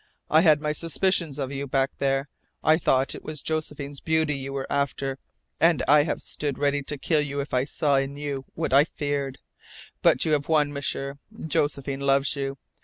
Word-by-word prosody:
I 155 - +6
had 155 -4 +5
my 150 -1 0
suspicions 165 -1 0
of 135 -2 -3
you 140 0 -4
back 135 +1 +1
there. 135 0 +1 0.4
I 155 +1 +5
thought 135 -4 +2
it - - -8
was 155 -3 -5
Josephine's 150 -3 -4
beauty 160 -2 +1
you 135 0 -5
were 135 -1 -3
after, 135 -1 -1 0.4
and 165 -2 +4
I 145 +2 +7
have 150 - -2
stood 145 -3 -3
ready 145 0 +1
to 145 +1 -4
kill 150 +2 +1
you 140 -1 -3
if 140 +1 -4
I 125 +1 +2
saw 145 -1 +1
in 135 +1 -1
you 140 -2 -4
what 160 -5 -2
I 140 +2 +8
feared. 145 -3 -3 0.6
But - - +4
you 160 - +1
have 145 0 +1
won, 150 -2 +3
M'sieur. 140 0 -3 0.3
Josephine 140 -3 -1
loves 140 +1 +2
you. 135 0 -3
140 Hz, 190 wpm, -26 LUFS, 135-150 Hz, 0.6 s, I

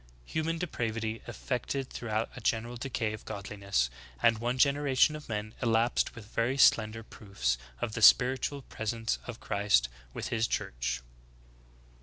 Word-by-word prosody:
Human 160 - -1
depravity 115 -9 -2
effected 130 +1 -3
throughout 110 -1 -2
a 125 - -8
general 115 +2 0
decay 120 -3 -2
of 110 - -8
godliness; 100 - -2 0.3
and 115 - +4
one 120 +2 -1
generation 140 +1 +4
of 150 -4 -9
men 110 0 -3
elapsed 115 0 +2
with 115 -3 -10
very 120 +4 +1
slender 115 -3 +4
proofs 70 - -2 0.2
of 105 - -2
the 115 - -3
spiritual 130 +5 +5
presence 115 0 -2
of 125 -2 -6
Christ 100 - +2 0.2
with - - -5
His 115 -1 +1
Church." - - -2
115 Hz, 140 wpm, -30 LUFS, 105-125 Hz, 0.3 s, spiritual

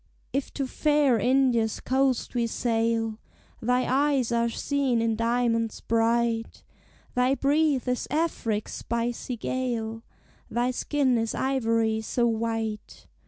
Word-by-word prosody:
"If 275 +1 -2
to 275 - -1
fair 290 -3 +2
India's 245 -2 +2
coast 265 -1 0
we 235 -2 +1
sail, 225 -1 0 0.4
Thy 250 +2 +2
eyes 270 -2 +2
are 235 0 +2
seen 270 0 0
in 225 -1 +1
diamonds 230 -1 0
bright, 230 0 0 0.5
Thy 250 +2 +2
breath 285 -1 +2
is 250 0 -1
Afric's 255 -9 -1
spicy 235 +1 -3
gale, 225 -2 -3 0.5
Thy 245 +1 0
skin 260 -1 +1
is 225 0 -2
ivory 230 -4 +1
so 235 +2 0
white. 225 -2 -2
235 Hz, 120 wpm, -26 LUFS, 225-260 Hz, 0.5 s, fair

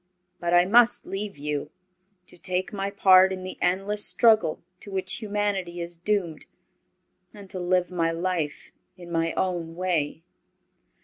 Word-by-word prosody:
But 170 0 -2
I 175 0 +6
must 235 +4 +4
leave 195 -2 -4
you, 145 0 -3 0.6
to - - -15
take 185 +2 -3
my 195 -1 -2
part 190 -1 +6
in 185 -1 -5
the 185 - -6
endless 195 +4 +1
struggle 220 -9 +3 0.2
to - - -11
which 190 -1 -2
humanity 205 -4 -2
is 170 0 -5
doomed, 175 -3 -2 0.9
and 200 -1 -11
to 190 - -5
live 180 0 0
my 165 -2 0
life 165 -3 -3 0.3
in 175 -1 -11
my 165 0 0
own 175 -3 -2
way." 165 -4 -1
185 Hz, 145 wpm, -25 LUFS, 170-195 Hz, 0.9 s, I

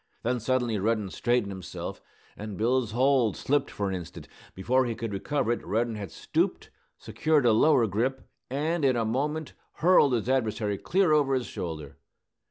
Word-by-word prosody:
Then 125 +1 0
suddenly 120 -2 0
Reddin 105 -1 0
straightened 120 -4 0
himself, 95 -2 -7 0.3
and 105 -2 -7
Bill's 120 +1 +1
hold 130 -3 +2
slipped 140 0 0
for 100 - -3
an 95 - -2
instant. 90 -3 -7 0.3
Before 125 +7 +1
he 115 - -3
could 110 -1 -5
recover 130 +4 -1
it 120 - -2
Reddin 115 +5 -1
had 105 -4 -6
stooped, - - -2 0.3
secured 155 -4 +1
a 120 - +6
lower 125 +1 +4
grip, 120 +6 -2 0.2
and 155 +5 -1
in 130 -2 +3
a 115 -1 0
moment 145 +7 -2 0.2
hurled 165 -6 +4
his 115 -1 -1
adversary 110 -5 0
clear 185 -2 +2
over 145 -3 +3
his 125 -2 -1
shoulder. 75 -5 -6
120 Hz, 170 wpm, -27 LUFS, 105-135 Hz, 0.3 s, a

